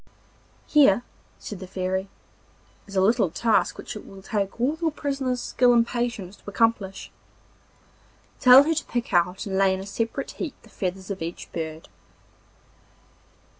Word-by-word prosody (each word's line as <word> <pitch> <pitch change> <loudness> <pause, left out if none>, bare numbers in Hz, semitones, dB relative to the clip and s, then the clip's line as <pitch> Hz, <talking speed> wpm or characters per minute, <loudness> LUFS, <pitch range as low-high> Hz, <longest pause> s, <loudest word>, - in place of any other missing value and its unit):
'Here,' 245 -7 +5 0.3
said 205 - -8
the 190 - -8
Fairy, 190 +1 -2 0.8
'is 200 - -10
a 190 - +3
little 210 -1 +3
task 220 +7 +1
which - - -7
it 210 - -8
will 195 -1 -13
take 200 -1 -2
all 265 +6 +1
your 330 - +2
prisoner's 275 -4 -2
skill 245 0 +3
and 235 -1 +4
patience 235 -6 -3
to - - -10
accomplish. 205 -3 0 1.3
Tell 255 +2 +9
her 325 +3 +1
to 325 - -2
pick 240 -4 -3
out 180 +4 +2
and 190 -1 -1
lay 190 -1 +4
in - - -6
a 190 - -7
separate 230 +6 -3
heap 320 -7 -5
the 230 - -17
feathers 190 +1 -4
of 195 - -5
each 170 +1 -6
bird. 160 -1 -5
205 Hz, 160 wpm, -25 LUFS, 190-245 Hz, 1.3 s, Tell